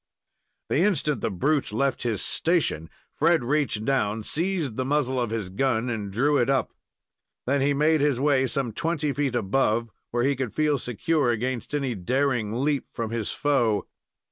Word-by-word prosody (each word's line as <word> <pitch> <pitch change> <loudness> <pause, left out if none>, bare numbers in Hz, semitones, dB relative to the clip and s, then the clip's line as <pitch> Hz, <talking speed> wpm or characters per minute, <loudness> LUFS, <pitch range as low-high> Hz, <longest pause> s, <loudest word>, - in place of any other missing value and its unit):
The - - +2
instant 150 - +1
the 115 - 0
brute 140 - 0
left 135 +5 0
his 115 -5 -1
station, 160 - 0 0.2
Fred 170 -5 +3
reached 125 -5 0
down, 110 -5 0
seized 165 - -1
the 130 - -1
muzzle 130 -2 0
of 120 - -1
his 110 -4 -3
gun, 120 +3 0
and 105 -3 -4
drew 140 +8 +2
it 120 - +2
up. 135 -1 +1 0.7
Then 140 +2 +1
he 140 +1 +2
made 155 +1 +3
his 145 -4 +2
way 135 -2 +3
some 135 -3 -2
twenty 160 -1 -1
feet 140 -3 -1
above, 115 0 +1 0.2
where 120 0 0
he 140 +2 +2
could 130 -4 -3
feel 150 -2 +2
secure 135 +4 0
against 120 +3 -2
any 135 -4 -1
daring 120 +2 0
leap 145 -2 0
from 115 -1 -4
his 115 -3 -2
foe. 120 -8 +1
130 Hz, 170 wpm, -25 LUFS, 115-145 Hz, 0.7 s, Fred